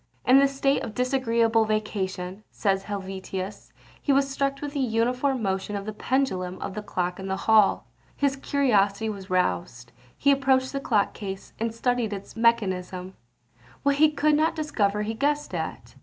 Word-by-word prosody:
In 260 +2 +7
this 275 0 +2
state 275 0 +2
of 215 - -6
disagreeable 235 -3 +2
vacation, 200 -3 -3
says 195 -2 0
Helvetius, 190 -1 -5 0.3
he 285 - +1
was 275 0 +3
struck 275 0 -1
with 290 0 -5
the 290 - -2
uniform 250 +1 +1
motion 195 +1 -2
of 200 -1 -4
the 215 - -4
pendulum 200 -7 -1
of 195 - -5
the 210 - -4
clock 180 -3 -3
in 190 - -5
the 190 0 -1
hall. 215 -2 +4 0.3
His 280 -1 +1
curiosity 220 -7 +1
was 200 -2 -7
roused; 115 - -1 0.3
he 280 - +4
approached 270 -1 +2
the 275 - -1
clock 215 -7 +1
case, 195 -2 -7
and 230 +1 -1
studied 230 -1 0
its 195 -1 -8
mechanism; 190 -5 0 0.7
what 280 0 +2
he 310 +1 +6
could 300 0 +2
not 310 +2 +2
discover 210 -10 0
he 220 +1 -2
guessed 290 +1 -1
at. 160 -8 -5
220 Hz, 170 wpm, -26 LUFS, 195-270 Hz, 0.7 s, In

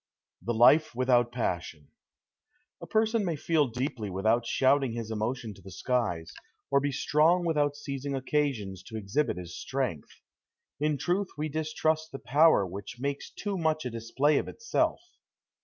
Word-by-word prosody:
THE 120 - -2
LIFE 130 +5 +5
WITHOUT 120 -1 +3
PASSION 85 - -3 0.9
A - - -8
person 220 0 +2
may 170 -4 -1
feel 150 0 +1
deeply 125 -3 -3
without 110 +5 +1
shouting 135 -2 +2
his 115 -1 -5
emotion 110 +1 -3
to 100 - -17
the 95 - -11
skies, 95 -5 -2 0.4
or 140 - +5
be 140 +1 -1
strong 160 +6 +3
without 145 -3 +1
seizing 140 -1 -4
occasions 130 -9 -1
to 110 - -6
exhibit 110 +5 -1
his 90 -1 -7
strength. 130 - -4 0.6
In 150 0 +1
truth 180 +7 0
we 155 +1 -2
distrust 155 +1 -1
the 135 - -5
power 145 -5 +4
which 100 +6 -8
makes 140 +1 -3
too 200 -2 -4
much 155 -3 0
a 125 - -3
display 130 +6 +1
of - - -4
itself. 460 0 -1
135 Hz, 155 wpm, -29 LUFS, 110-150 Hz, 0.9 s, LIFE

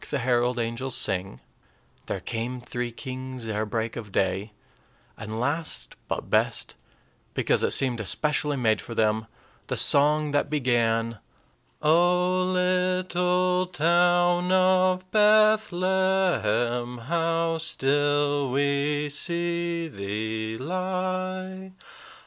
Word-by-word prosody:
the 145 - -1
herald 125 -1 +1
angels 120 +2 -3
sing," 95 0 0 0.7
"There - - -3
came 120 +3 -4
three 120 0 -5
kings 130 -1 -6
ere 110 0 -2
break 115 +1 -3
of 110 -4 -7
day," 95 +3 -1 0.6
and 110 +1 -6
last, 150 +6 -2
but - - -4
best, - - 0 0.6
because - - +1
it - - +2
seemed 125 -3 +3
especially 150 +7 0
made 110 -4 +1
for 115 - -8
them, 110 0 +1 0.4
the - - -2
song 150 +1 +3
that 145 0 0
began: 115 -5 0 0.6
"O 180 +3 +3
little 180 0 +1
town 175 +1 +2
of 185 0 +3
Bethlehem, 190 - +2
How 165 +5 -1
still 145 -1 +1
we 145 +2 0
see 170 +2 -2
thee 110 -1 -4
lie! 185 +3 -3
145 Hz, 100 wpm, -25 LUFS, 120-180 Hz, 0.7 s, seemed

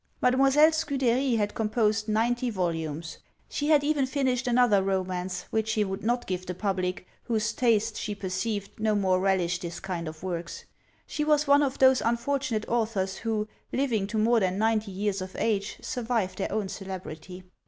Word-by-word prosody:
Mademoiselle 270 +5 +5
Scudery 270 -5 +1
had 205 -2 0
composed 215 0 0
ninety 240 +3 +1
volumes! 165 -5 -3 0.3
She 290 - -3
had 295 -2 +5
even 290 -2 +1
finished 260 -2 0
another 240 -5 +4
romance, 185 -1 -2
which 220 0 0
she 220 -1 +1
would 195 0 -4
not 240 +2 0
give 185 -1 -3
the 180 - -4
public, 185 -2 -2 0.2
whose 225 -1 0
taste, 225 -3 +1
she 210 - -3
perceived, 200 +2 -3
no 215 -1 +1
more 190 -2 +2
relished 185 -2 +1
this 170 -1 -5
kind 180 -4 -4
of 155 +2 -8
works. 170 -2 -5 0.4
She 300 - -2
was 300 0 +3
one 285 0 +5
of 275 -2 0
those 260 -1 +5
unfortunate 235 -1 -1
authors 215 -5 -1
who, 220 -2 -2 0.2
living 235 -7 0
to 220 +2 -3
more 230 +2 +4
than 185 -2 0
ninety 220 0 +1
years 200 0 -2
of 185 0 -7
age, 210 -2 -1
survive 230 -6 -1
their 195 - -3
own 210 -3 -1
celebrity. 185 -2 -7
215 Hz, 170 wpm, -27 LUFS, 190-245 Hz, 0.4 s, Mademoiselle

